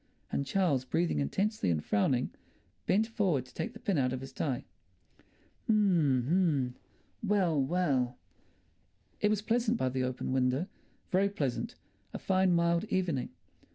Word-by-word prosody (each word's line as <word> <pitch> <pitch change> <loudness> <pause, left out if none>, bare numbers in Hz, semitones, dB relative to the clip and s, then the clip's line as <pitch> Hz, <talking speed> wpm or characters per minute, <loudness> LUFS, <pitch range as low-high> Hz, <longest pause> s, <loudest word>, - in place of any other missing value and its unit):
And 140 - -1
Charles, 165 -9 +2
breathing 80 - 0
intensely 200 - 0
and 80 -3 0
frowning, 125 +5 +1 0.6
bent 205 +4 +3
forward 195 - 0
to 125 - -18
take 160 - -4
the - - -11
pin 190 -7 0
out 125 -1 +1
of 130 0 -3
his 135 - -9
tie. 135 -5 -2 1.0
H'm, 175 - +3
h'm! 145 -6 +1 0.5
Well, 190 -8 +2
well! 135 -5 +1 1.0
It 210 - +3
was 210 -1 0
pleasant 235 0 +1
by 130 - 0
the 130 0 -2
open 130 0 -2
window, 130 +4 +1 0.5
very 195 +2 +3
pleasant—a 140 -11 -5
fine 190 -1 +2
mild 170 +2 +2
evening. 175 - -1
160 Hz, 140 wpm, -31 LUFS, 130-195 Hz, 1.0 s, bent